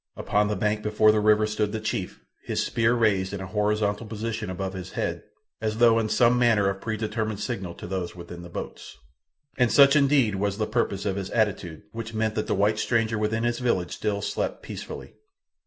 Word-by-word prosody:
Upon 105 0 +1
the 105 - -1
bank 105 +2 0
before 105 0 +4
the 105 - +2
river 105 0 +4
stood 105 -1 -1
the 110 - -2
chief, 100 -4 -4 0.2
his - - -1
spear 115 +1 +2
raised 100 -5 +1
in 100 - -3
a 95 - -5
horizontal 105 +2 0
position 110 -1 -4
above 95 +1 -4
his 95 -2 -7
head, - - -2 0.4
as 110 -1 -1
though 115 -1 +5
in 110 -1 -1
some 120 +2 +4
manner 110 -5 +4
of 95 - -8
predetermined 110 -1 -2
signal 95 -8 -4
to - - -9
those 90 -1 -4
within 85 0 -9
the 85 - -10
boats. - - -8 0.6
And 125 -2 +4
such 140 0 +7
indeed 140 -6 +4
was 100 0 -1
the 110 - 0
purpose 105 -5 -1
of 100 -1 -1
his 95 -1 -4
attitude—which 105 +1 -2
meant 110 0 0
that 110 - -2
the - - +1
white 105 +2 +2
stranger 115 -2 +1
within 110 +2 0
his 120 0 0
village 105 -8 0
still 100 -2 -2
slept - - -3
peacefully. - - -8
105 Hz, 200 wpm, -26 LUFS, 100-115 Hz, 0.6 s, such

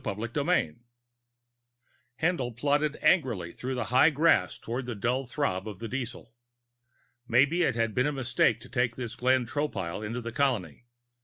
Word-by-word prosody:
VIII 115 - -1 1.5
Haendl 160 -9 +1
plodded 145 +3 +1
angrily 115 - +2
through 130 +6 -5
the 125 - -1
high 130 +5 +7
grass 150 - +2
toward 120 +2 -5
the 120 - -3
dull 125 +6 -1
throb 110 -9 -2
of 105 -3 -6
the 115 - -6
diesel. 120 -2 -6 0.9
Maybe 140 +9 +3
it 165 - +2
had 115 -2 0
been 130 +6 +2
a - - 0
mistake 120 -4 +1
to 125 - -12
take 120 -2 0
this 120 -2 -5
Glenn 130 0 +2
Tropile 110 - -3
into 115 +4 -3
the 115 -1 -5
colony. 120 - -1
125 Hz, 155 wpm, -28 LUFS, 115-140 Hz, 1.5 s, high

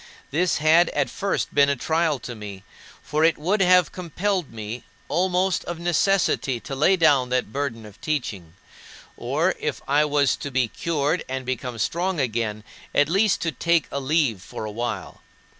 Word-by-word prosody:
This 170 +4 +1
had 160 +3 +5
at - - 0
first 200 0 -2
been 140 0 +5
a 140 - +2
trial 160 +3 0
to 120 - -6
me, 100 -3 -9 0.4
for 155 +1 0
it 165 0 +4
would 190 +7 0
have 180 -3 +5
compelled 180 -1 -2
me 110 +2 -6 0.2
almost 185 +1 +1
of 175 - -4
necessity 170 -6 +1
to 140 - -7
lay 170 +8 +4
down 140 -7 +4
that 125 -3 -1
burden 130 -6 -3
of 105 -2 -14
teaching; 105 - -3 0.6
or, - - 0
if - - -2
I 145 +2 +3
was 145 -2 +2
to 145 - -5
be 130 -2 +1
cured 155 +5 -1
and 130 0 -3
become 125 -1 -4
strong 175 - -1
again, 110 -4 -1 0.3
at 145 +1 +4
least 195 +2 +2
to 165 - 0
take 170 +2 +1
a 140 - -2
leave 135 - +1
for 110 - -7
a 105 - -5
while. 115 -3 -4
145 Hz, 175 wpm, -24 LUFS, 125-170 Hz, 0.6 s, had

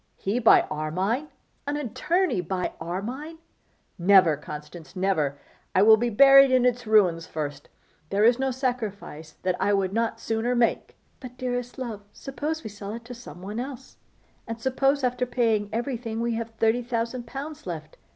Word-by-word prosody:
'He 205 +5 -2
buy 230 - +6
Armine! 185 - -1 0.4
An 290 +1 -1
attorney 295 - 0
buy 180 +1 -3
Armine! 240 - -5 0.6
Never, 180 -3 +6
Constance, 150 +4 -10
never! 170 -7 0 0.4
I 190 - +6
will 220 +1 +8
be 240 +2 -1
buried 275 +4 +7
in 255 -1 +3
its 245 -2 0
ruins 180 -7 +3
first. 145 -2 -5 0.4
There 200 +1 +1
is 235 +2 +5
no 265 0 +1
sacrifice 220 - -4
that 185 -1 +1
I 205 - +2
would 195 -1 0
not 230 0 -1
sooner 230 +2 -1
make 235 -1 0
' - - -39
'But, 250 -2 -10
dearest 245 -1 -3
love, 235 -6 -5
suppose 300 +3 -4
we - - -6
sell 205 0 -7
it 230 0 -8
to 245 - -8
some 185 -8 -11
one 210 +4 -5
else, 265 0 -7 0.5
and 230 0 -5
suppose 270 +3 +1
after 250 0 0
paying 225 -4 +1
every 240 +3 -2
thing 225 -1 -5
we 235 0 0
have 230 0 -3
thirty 225 +2 +2
thousand 235 0 -3
pounds 285 +1 -7
left. 160 -3 -7
230 Hz, 170 wpm, -26 LUFS, 195-250 Hz, 0.6 s, will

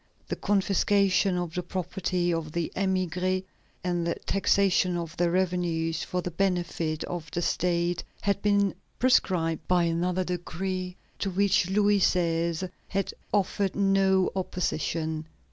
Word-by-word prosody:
The - - -1
confiscation 195 -1 +2
of 175 -2 -3
the 180 - -1
property 180 0 -1
of 160 -2 -3
the 170 -1 -2
émigrés 185 -1 0 0.4
and 175 -1 0
the 170 - 0
taxation 195 -2 +2
of 165 -2 -5
their 175 0 +2
revenues 170 -3 0
for 180 -1 -2
the 180 - -3
benefit 170 -4 -1
of 170 -3 -5
the 175 - -2
State 175 0 0 0.2
had 200 0 0
been 200 -1 +3 0.2
prescribed 165 -10 +2
by 180 -1 +3
another 175 +2 0
decree 180 +1 -3 0.2
to 200 - -1
which 195 -1 +2
Louis 205 +1 +3
XVI. 170 0 +1 0.2
had 195 0 -2 0.2
offered 200 -1 +1
no 195 -1 +3
opposition. 160 -3 -2
180 Hz, 130 wpm, -27 LUFS, 170-195 Hz, 0.4 s, been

